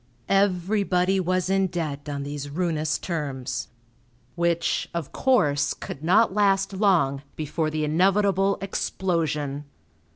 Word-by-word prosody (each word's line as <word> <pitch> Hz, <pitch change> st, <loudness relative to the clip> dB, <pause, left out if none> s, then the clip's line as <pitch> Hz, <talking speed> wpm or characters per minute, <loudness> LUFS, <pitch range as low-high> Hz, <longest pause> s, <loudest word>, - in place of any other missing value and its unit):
Everybody 195 Hz, -1 st, +2 dB
was 185 Hz, 0 st, 0 dB
in 195 Hz, 0 st, +2 dB
debt 155 Hz, -5 st, -4 dB
on 140 Hz, -1 st, -3 dB
these 145 Hz, 0 st, -5 dB
ruinous 155 Hz, -1 st, -1 dB
terms; 135 Hz, -7 st, -4 dB, 0.7 s
which, 170 Hz, +2 st, 0 dB
of 165 Hz, -5 st, -3 dB
course, 150 Hz, -, +2 dB
could 140 Hz, -, -8 dB
not 185 Hz, +5 st, +4 dB
last 195 Hz, -1 st, +2 dB
long 180 Hz, -9 st, +2 dB
before 155 Hz, +1 st, -2 dB
the 155 Hz, 0 st, -2 dB
inevitable 195 Hz, +4 st, +2 dB
explosion. 150 Hz, -7 st, -2 dB
170 Hz, 110 wpm, -25 LUFS, 150-195 Hz, 0.7 s, not